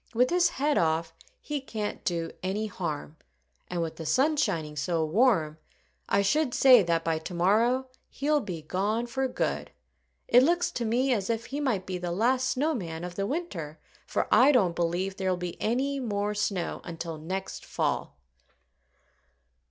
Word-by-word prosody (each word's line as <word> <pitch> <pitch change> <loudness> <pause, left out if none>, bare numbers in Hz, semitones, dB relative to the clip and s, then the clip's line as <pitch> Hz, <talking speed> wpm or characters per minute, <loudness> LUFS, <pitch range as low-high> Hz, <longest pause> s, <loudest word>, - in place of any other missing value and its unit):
"With 250 +2 +3
his 355 0 +4
head 290 +1 +1
off, 160 0 0 0.3
he 295 -2 -4
can't 215 -5 -5
do 165 -2 -2
any 195 +4 -1
harm. 160 -6 -5 0.5
And 175 -1 -2
with 160 - -5
the 160 - -6
sun 275 - +3
shining 155 - -1
so 160 +2 0
warm 165 -5 +2 0.5
I 200 - +3
should 285 +5 +1
say 255 -4 +8
that 170 -2 0
by 165 -1 0
to 160 - -7
morrow 225 +9 +3 0.2
he'll 295 +2 +1
be 180 - -6
gone 205 +8 -1
for 265 +2 -1
good. 250 - -2 0.6
It 245 - +7
looks 345 +5 +2
to 240 - -3
me 250 +4 +2
as 200 -3 -2
if 230 0 -1
he 280 - -4
might 235 -10 0
be 185 -1 -4
the 175 0 -3
last 250 +7 +2
snow 295 +5 +1
man 165 - -5
of 180 0 -5
the 195 +2 -2
winter, 175 - -4 0.3
for - - -1
I 255 +6 +7
don't 190 -11 +3
believe 175 +3 -1
there'll 190 -2 0
be 175 -1 -6
any 270 +5 0
more 210 -4 -1
snow 205 -4 -2
until 165 -2 -6
next 190 +5 -5
fall." - - -2
200 Hz, 170 wpm, -28 LUFS, 170-255 Hz, 0.6 s, say